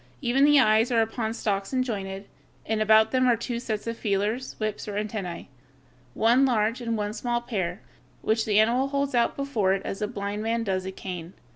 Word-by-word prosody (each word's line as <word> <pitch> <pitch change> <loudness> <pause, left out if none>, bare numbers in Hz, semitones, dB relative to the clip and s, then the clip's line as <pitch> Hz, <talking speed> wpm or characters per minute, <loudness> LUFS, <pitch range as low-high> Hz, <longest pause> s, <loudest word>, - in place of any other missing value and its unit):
Even 270 +1 +3
the 295 -1 +6
eyes 220 -1 +4
are 230 -2 +4
upon 225 0 -3
stalks 200 -4 -2
and 255 -1 +1
jointed, 195 -4 -5 0.4
and 220 0 -1
about 220 0 +5
them 255 -1 +3
are 240 -2 +4
two 235 +1 -3
sets 220 -3 -4
of 230 0 -3
feelers, 210 +5 -1
whips, 215 -1 -3
or 205 - -4
antennæ 205 -4 -4 0.7
one 235 +4 +4
large 230 -2 +1
and 230 -1 -1
one 210 0 -2
small 240 +1 -1
pair 195 -6 -3 0.4
which 220 +1 +1
the 210 -1 +3
animal 240 +5 +3
holds 280 0 -1
out 235 -1 +2
before 230 -9 0
it 195 - -1
as 195 - -4
a 210 - 0
blind 205 0 -4
man 230 +1 -1
does 190 -3 -2
a - - -3
cane. 180 -2 -7
220 Hz, 205 wpm, -26 LUFS, 205-240 Hz, 0.7 s, the